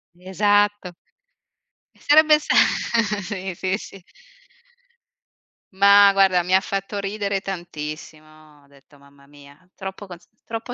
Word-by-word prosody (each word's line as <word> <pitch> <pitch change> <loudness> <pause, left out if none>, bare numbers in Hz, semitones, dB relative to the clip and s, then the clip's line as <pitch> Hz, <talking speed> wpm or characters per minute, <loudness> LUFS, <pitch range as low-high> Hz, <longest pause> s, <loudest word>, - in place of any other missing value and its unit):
Esatto. 205 +1 0 1.0
Sarebbe 305 +1 +4
sta - - -2 0.7
sì, 190 0 -6
sì, 185 +2 -2
sì. 195 -4 -13 1.7
Ma, 200 +1 +6
guarda, 190 -2 +3
mi 180 +2 0
ha 190 - +5
fatto 195 +1 -5
ridere 200 -1 -3
tantissimo. 155 -4 -10
Ho - - -26
detto 140 +1 -23
mamma 140 0 -22
mia, 145 +4 -19
troppo 190 +1 -9
cos 175 -1 -13 0.2
troppo 225 +2 -7
190 Hz, 110 wpm, -21 LUFS, 155-200 Hz, 1.7 s, Ma